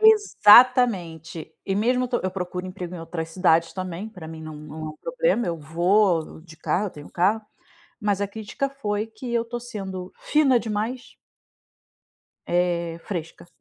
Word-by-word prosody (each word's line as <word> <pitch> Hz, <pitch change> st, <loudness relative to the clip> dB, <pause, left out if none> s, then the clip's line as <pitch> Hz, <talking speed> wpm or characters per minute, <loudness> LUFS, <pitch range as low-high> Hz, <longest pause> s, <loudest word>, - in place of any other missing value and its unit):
Exatamente. 230 Hz, -, +5 dB
E 195 Hz, -, -1 dB
mesmo 250 Hz, +5 st, +2 dB
estou 245 Hz, -1 st, -1 dB
eu 185 Hz, -, -1 dB
procuro 180 Hz, -1 st, -4 dB
emprego 180 Hz, -1 st, -6 dB
em 175 Hz, -, -6 dB
outras 165 Hz, 0 st, -5 dB
cidades 165 Hz, -2 st, +3 dB
também, 185 Hz, +2 st, -5 dB
pra 180 Hz, -7 st, -10 dB
mim 160 Hz, 0 st, -8 dB
não 155 Hz, 0 st, -7 dB
não 150 Hz, +1 st, -10 dB
é 155 Hz, -, -4 dB
um 155 Hz, -, -13 dB
problema, -, -, 0 dB
eu 170 Hz, -1 st, -1 dB
vou 170 Hz, +2 st, +2 dB
de 160 Hz, -2 st, -14 dB
carro, 195 Hz, +5 st, 0 dB
eu -, -, -5 dB
tenho 145 Hz, -1 st, -11 dB
carro, 200 Hz, +5 st, +2 dB, 0.6 s
mas 205 Hz, -1 st, 0 dB
a 200 Hz, -, +1 dB
crítica 220 Hz, +6 st, -4 dB
foi 215 Hz, -6 st, -2 dB
que 225 Hz, +2 st, -8 dB
eu 235 Hz, -1 st, +2 dB
estou 240 Hz, +1 st, -5 dB
sendo 195 Hz, -6 st, -6 dB
fina 280 Hz, -5 st, +3 dB
demais 225 Hz, +3 st, -4 dB, 1.3 s
Eh, 170 Hz, -1 st, 0 dB
fresca. 170 Hz, -3 st, -6 dB
190 Hz, 165 wpm, -24 LUFS, 170-230 Hz, 1.3 s, Exatamente